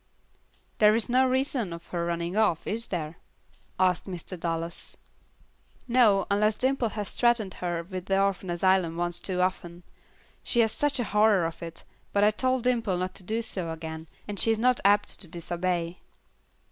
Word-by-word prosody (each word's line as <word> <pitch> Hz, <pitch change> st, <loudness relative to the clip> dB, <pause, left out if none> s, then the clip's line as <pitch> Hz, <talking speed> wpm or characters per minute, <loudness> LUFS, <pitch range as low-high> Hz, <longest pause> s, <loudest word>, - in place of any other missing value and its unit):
"There 210 Hz, 0 st, +6 dB
is 225 Hz, 0 st, +1 dB
no 260 Hz, +2 st, +4 dB
reason 255 Hz, -8 st, -1 dB
for 170 Hz, +1 st, -8 dB
her 170 Hz, -, 0 dB
running 170 Hz, +1 st, -2 dB
off, 210 Hz, -7 st, +2 dB
is 230 Hz, +2 st, -3 dB
there?" 165 Hz, -2 st, -4 dB, 0.6 s
asked 185 Hz, -2 st, +2 dB
Mr. 185 Hz, -1 st, -6 dB
Dallas. 165 Hz, -1 st, -4 dB, 0.9 s
"No, 235 Hz, -5 st, +4 dB
unless 210 Hz, +1 st, +3 dB
Dimple 260 Hz, -2 st, +1 dB
has 210 Hz, -1 st, -5 dB
threatened 235 Hz, -5 st, +2 dB
her 175 Hz, -2 st, -2 dB
with 185 Hz, 0 st, -7 dB
the 195 Hz, 0 st, +2 dB
orphan 195 Hz, -1 st, 0 dB
asylum 175 Hz, -1 st, +2 dB
once 175 Hz, 0 st, -2 dB
too 180 Hz, -2 st, -1 dB
often. 175 Hz, -1 st, -2 dB, 0.6 s
She 240 Hz, -, +2 dB
has 225 Hz, -1 st, +2 dB
such 290 Hz, +1 st, 0 dB
a -, -, +1 dB
horror 210 Hz, -4 st, +3 dB
of 165 Hz, 0 st, -5 dB
it, 165 Hz, -1 st, -8 dB, 0.3 s
but 200 Hz, -, +3 dB
I 210 Hz, -, +6 dB
told 255 Hz, +2 st, 0 dB
Dimple 230 Hz, -7 st, +1 dB
not 185 Hz, +1 st, -2 dB
to -, -, -11 dB
do 220 Hz, +5 st, -2 dB
so 185 Hz, -6 st, -3 dB
again, 160 Hz, 0 st, -7 dB, 0.2 s
and 205 Hz, -2 st, -5 dB
she -, -, +3 dB
is 225 Hz, -, +3 dB
not 250 Hz, +2 st, +3 dB
apt 205 Hz, +1 st, +3 dB
to 185 Hz, -, -4 dB
disobey." 175 Hz, +1 st, -2 dB
190 Hz, 175 wpm, -27 LUFS, 175-220 Hz, 0.9 s, There